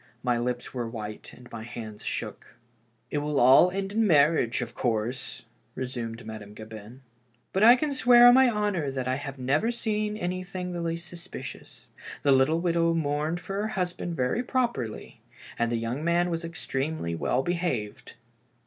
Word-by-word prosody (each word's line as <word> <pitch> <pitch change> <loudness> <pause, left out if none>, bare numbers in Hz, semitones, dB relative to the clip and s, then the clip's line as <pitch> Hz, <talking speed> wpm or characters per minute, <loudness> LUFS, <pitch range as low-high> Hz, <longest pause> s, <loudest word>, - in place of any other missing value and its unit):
My 120 -2 +1
lips 125 0 -3
were 120 -3 -3
white 105 -2 -7
and 125 - -14
my 115 - -6
hands 110 -2 -8
shook. - - -5 0.6
"It 145 - 0
will 145 +2 +5
end 195 +1 -3
in 220 - 0
a - - +5
marriage, 145 - +3
of 120 - -9
course," 120 +2 -2 0.3
resumed 120 -3 -5
Ma 110 0 -6
dame 105 0 -12
Gabin. 110 +4 -10 0.2
" 120 0 -41
But 195 - +2
I 235 +2 +9
can 295 +3 -1
swear 245 -2 +7
on 245 - +10
my 260 0 +6
honor 205 -9 0
that 130 -2 -3
I 130 - +1
have 140 -1 -7
never 140 - +1
seen 215 -3 -1
anything 185 -1 -4
the 175 - -3
least 170 +1 -3
suspicious. 175 -1 -9 0.4
The 140 - +4
little 135 +5 +4
widow 170 -1 +2
mourned 155 +2 -1
for 185 +2 -7
her 215 - -1
husband 175 -1 -2
very 130 - 0
properly, 235 - -2 0.4
and 120 0 +1
the - - +1
young 115 +6 -3
man 175 +1 +2
was 165 0 -2
extremely 155 - -3
well 125 +10 0
behaved. 170 -12 -3
145 Hz, 175 wpm, -27 LUFS, 120-180 Hz, 0.6 s, on